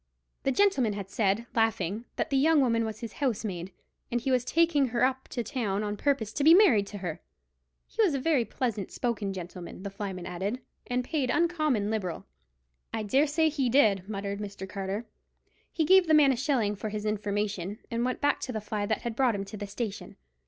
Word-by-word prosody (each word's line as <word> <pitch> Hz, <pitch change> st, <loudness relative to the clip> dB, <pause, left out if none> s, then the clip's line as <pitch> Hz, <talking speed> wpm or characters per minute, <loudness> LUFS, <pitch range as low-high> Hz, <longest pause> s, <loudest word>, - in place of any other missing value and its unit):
The 270 Hz, -, +1 dB
gentleman 270 Hz, -, +3 dB
had 200 Hz, -1 st, -6 dB
said, 210 Hz, +2 st, +1 dB
laughing, 225 Hz, -1 st, 0 dB
that -, -, -2 dB
the -, -, +2 dB
young 305 Hz, +3 st, +4 dB
woman 230 Hz, -4 st, +2 dB
was 220 Hz, -1 st, -6 dB
his 230 Hz, -3 st, -6 dB
housemaid, 200 Hz, -8 st, -2 dB, 0.4 s
and 240 Hz, -, +1 dB
he 260 Hz, +3 st, -1 dB
was 250 Hz, -1 st, +3 dB
taking 325 Hz, -1 st, +3 dB
her 245 Hz, 0 st, 0 dB
up 260 Hz, 0 st, -2 dB
to 240 Hz, -, -3 dB
town 215 Hz, -5 st, -2 dB
on 210 Hz, 0 st, -2 dB
purpose 225 Hz, -3 st, 0 dB
to 285 Hz, -, -1 dB
be 320 Hz, +3 st, +8 dB
married 245 Hz, -, +5 dB
to 205 Hz, -, -7 dB
her. 175 Hz, -4 st, -5 dB, 0.6 s
He -, -, -2 dB
was 365 Hz, -10 st, +3 dB
a -, -, 0 dB
very 285 Hz, -3 st, +2 dB
pleasant 225 Hz, -5 st, -3 dB
spoken 220 Hz, -5 st, -2 dB
gentleman, 180 Hz, 0 st, -8 dB
the 200 Hz, -, -5 dB
flyman 195 Hz, -3 st, -5 dB
added, 190 Hz, +7 st, -3 dB, 0.3 s
and 250 Hz, 0 st, 0 dB
paid 275 Hz, -1 st, -1 dB
uncommon 305 Hz, -10 st, +1 dB
liberal. 185 Hz, -7 st, -3 dB, 0.7 s
"I 220 Hz, -, -2 dB
dare 270 Hz, +9 st, +3 dB
say 320 Hz, +2 st, +2 dB
he 285 Hz, -5 st, 0 dB
did," 210 Hz, -7 st, +3 dB
muttered 200 Hz, -1 st, -3 dB
Mr. 200 Hz, -2 st, -6 dB
Carter. 195 Hz, +3 st, -4 dB, 0.7 s
He 320 Hz, -, 0 dB
gave 375 Hz, +1 st, +6 dB
the 315 Hz, -, +5 dB
man 290 Hz, -3 st, +6 dB
a -, -, +1 dB
shilling 240 Hz, -6 st, 0 dB
for 215 Hz, +2 st, -4 dB
his 210 Hz, 0 st, -4 dB
information, 205 Hz, -2 st, -2 dB
and 230 Hz, 0 st, 0 dB
went 255 Hz, 0 st, -2 dB
back 290 Hz, 0 st, +2 dB
to 255 Hz, -, -4 dB
the 220 Hz, -, -2 dB
fly 210 Hz, -1 st, -3 dB
that 220 Hz, -, -1 dB
had 235 Hz, -2 st, -3 dB
brought 250 Hz, -3 st, +2 dB
him 195 Hz, 0 st, -3 dB
to 195 Hz, -, -9 dB
the 205 Hz, -1 st, -5 dB
station. 205 Hz, 0 st, -5 dB
225 Hz, 210 wpm, -28 LUFS, 200-270 Hz, 0.7 s, be